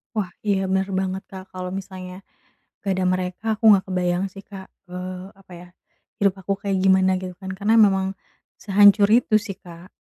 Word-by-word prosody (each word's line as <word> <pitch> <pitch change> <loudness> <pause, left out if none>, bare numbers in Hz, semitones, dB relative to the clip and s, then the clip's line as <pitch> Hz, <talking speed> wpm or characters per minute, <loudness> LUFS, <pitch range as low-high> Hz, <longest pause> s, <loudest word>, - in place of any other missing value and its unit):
Wah 200 -5 -2 0.2
iya 195 -2 +1
bener 190 0 +1
banget 190 0 -3
Kak, 190 0 -11
kalau 185 0 -6
misalnya 185 -1 -8 0.6
gak 195 - -1
ada 190 - -1
mereka, 185 +2 -2
aku - - -33
gak 190 - -1
kebayang 180 0 -1
sih 195 - -12
Kak, 195 -2 -11 0.2
eee, 180 +1 -7
apa 195 -1 -21
ya, 180 - -13 0.6
hidup 200 -1 +4
aku 195 +2 -1
kayak 195 -1 -1
gimana 190 -1 +3
gitu 185 -1 -7
kan, 190 -1 -6
karena 210 +3 +2
memang 195 -3 +3 0.4
sehancur 205 +1 +5
itu 230 -1 +3
sih 200 -3 -7
Kak. 175 0 -14
190 Hz, 180 wpm, -22 LUFS, 185-195 Hz, 0.6 s, sehancur